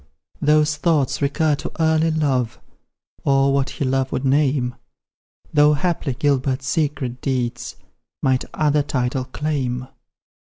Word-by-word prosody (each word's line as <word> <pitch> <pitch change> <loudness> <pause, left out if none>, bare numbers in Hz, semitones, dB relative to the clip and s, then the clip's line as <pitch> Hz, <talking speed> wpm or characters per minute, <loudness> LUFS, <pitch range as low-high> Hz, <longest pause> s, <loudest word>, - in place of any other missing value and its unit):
Those 150 +1 +3
thoughts 150 -5 +1
recur 150 +2 +1
to - - -6
early 160 0 +3
love, 140 -7 0 0.6
Or 135 0 +3
what 140 -1 +1
he 140 - -3
love 130 0 0
would 130 - -2
name, 135 -2 +2 0.8
Though 150 0 +5
haply 155 -4 -1
Gilbert's 135 -1 0
secret 140 -6 -1
deeds 125 -3 -2 0.5
Might 130 -1 +2
other 150 -1 +2
title 130 -2 -1
claim. 130 -3 -3
140 Hz, 120 wpm, -21 LUFS, 130-150 Hz, 0.8 s, Though